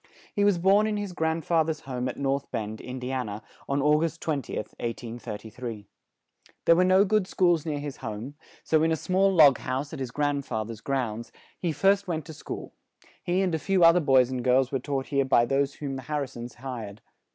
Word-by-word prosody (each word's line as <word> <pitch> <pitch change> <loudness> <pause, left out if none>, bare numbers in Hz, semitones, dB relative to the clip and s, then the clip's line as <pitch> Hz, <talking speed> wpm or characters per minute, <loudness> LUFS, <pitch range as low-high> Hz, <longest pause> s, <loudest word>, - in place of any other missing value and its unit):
He 205 - +1
was 205 -3 +4
born 195 +5 +4
in 215 -1 -1
his 205 -3 -4
grand 160 -1 -1
fa 165 -2 +3
ther's 155 -1 -3
home 130 -1 -3
at - - -7
North 140 0 -1
Bend, 110 0 -4
In 125 +1 -6
di 125 0 -4
an 130 -4 -2
a, 105 +1 -7 0.3
on 140 0 +1
Au 150 +1 +4
gust 165 +1 -2
20th, 140 -8 -3
1833. 115 -1 -6 0.8
There 165 - +6
were 180 - +4
no 185 +2 +5
good 210 -1 +1
schools 175 -5 +2
near 150 -2 -1
his 145 -1 -6
home; 115 +3 -6 0.3
so 155 -1 +2
in 160 +1 +2
a - - +3
small 190 +4 +2
log 150 -8 +6
house, 135 +4 -3
in 155 - -6
his 130 -2 -3
grand 145 +2 -1
fa 110 0 -2
ther's 115 0 -8
grounds, 120 -4 -2 0.3
he 175 - -1
first 195 +6 +2
went 160 -4 -2
to 160 - -9
school; - - -7 0.5
he 180 +2 +1
and 180 -3 0
a 160 - 0
few 185 +3 +2
oth 165 0 +8
er - - +5
boys 130 -5 +4
and 125 -2 -3
girls 130 +1 +3
were 135 - 0
taught 135 +1 -3
here 140 -1 +2
by 130 -3 +4
those 135 +2 0
whom 140 -2 -4
the - - -6
Har 150 +3 -2
ri 140 - -2
sons 120 -1 -9
hired. 115 -5 -7
140 Hz, 230 wpm, -27 LUFS, 125-165 Hz, 0.8 s, oth